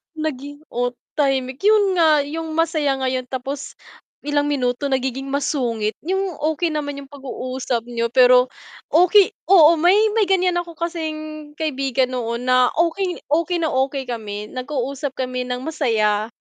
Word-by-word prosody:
naging 290 -2 -5
o 245 +1 -1 0.2
tahimik 265 -2 0
yun 410 -3 +4
nga 310 -3 +5
yung 320 +2 -5
masaya 315 -3 +1
ngayon 255 -1 -1
tapos 270 +2 -5 0.5
ilang 290 0 +1
minuto 260 0 -1
nagiging 265 +1 -2
masungit, 245 -6 -1
yung 380 0 -1
okay 315 +3 0
naman 285 -2 -3
yung 275 - -11
pag-uusap 255 -3 -4
niyo 235 -1 -2
pero 250 0 +6 0.4
okay 365 +5 +6 0.2
oo, 335 -3 +7
may 350 +4 +4 0.2
may 440 -2 +3
ganyan 365 -2 +2
ako 345 -1 -4
kasing 310 -3 -5
kaibigan 270 -4 0
noon 240 -1 -3
na 255 0 +5
okay 350 +2 0
okay 335 +3 +1
na 320 - +1
okay 265 +1 0
kami 210 -3 -5
nag-usap 270 +1 -4
kami 255 -1 -3
ng 250 0 -3
masaya. 220 -9 0
280 Hz, 145 wpm, -21 LUFS, 255-320 Hz, 0.5 s, oo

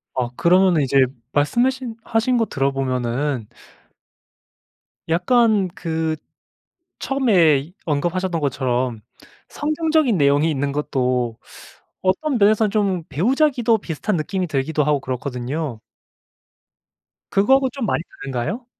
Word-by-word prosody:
아 125 -2 -1
그러면은 180 -2 +4
이제 135 0 +4 0.3
말씀 150 - +2
하신 260 -3 -2
하신 235 +2 +1
거 225 - +2
들어보면은 135 - -1 1.6
약간 210 +3 +3
그 160 -5 -2 0.8
처음에 175 - +2
언급하셨던 170 +3 -1
것처럼 130 -4 -1 0.5
성경적인 310 - +1
내용이 145 +2 +3
있는 140 -1 -1
것도 125 -5 -1 0.6
어떤 235 +9 0
면에서는 215 0 +3
좀 195 -5 0
배우자 255 - +2
기도 240 -4 +1
비슷한 185 +1 -3
느낌이 180 +3 -2
들기도 150 +1 0
하고 150 -1 +1
그렇거든요. 130 +1 -4 1.5
그거 205 +7 +4
하고 270 -1 +1
좀 265 -4 -4
많이 175 - 0 0.2
다른가요? 135 - -3
165 Hz, 265 characters per minute, -21 LUFS, 135-220 Hz, 1.6 s, 그러면은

